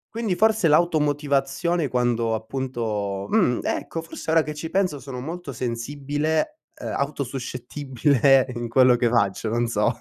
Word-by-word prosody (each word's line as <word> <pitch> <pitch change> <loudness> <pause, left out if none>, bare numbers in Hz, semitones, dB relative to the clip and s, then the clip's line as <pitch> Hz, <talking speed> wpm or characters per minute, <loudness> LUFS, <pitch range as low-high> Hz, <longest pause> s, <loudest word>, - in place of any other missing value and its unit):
Quindi 225 -6 -1
forse 220 -4 +3
l'automotivazione 150 0 +1
quando 120 -3 0
appunto 110 -5 -3
mh, 185 - +2
ecco, 165 -1 -3
forse 165 - -8
ora 160 0 +4
che 150 - -5
ci 160 +2 -6
penso 185 -7 0
sono 130 -1 -7
molto 165 +1 -6
sensibile, 145 - -2 0.2
uhm, - - -5
auto-suscettibile 135 0 +1
in 120 0 -4
quello 125 +1 +5
che 120 -1 +1
faccio, 110 -2 +1
non 120 +2 +1
so. 115 +1 0
135 Hz, 140 wpm, -24 LUFS, 120-155 Hz, 0.2 s, quello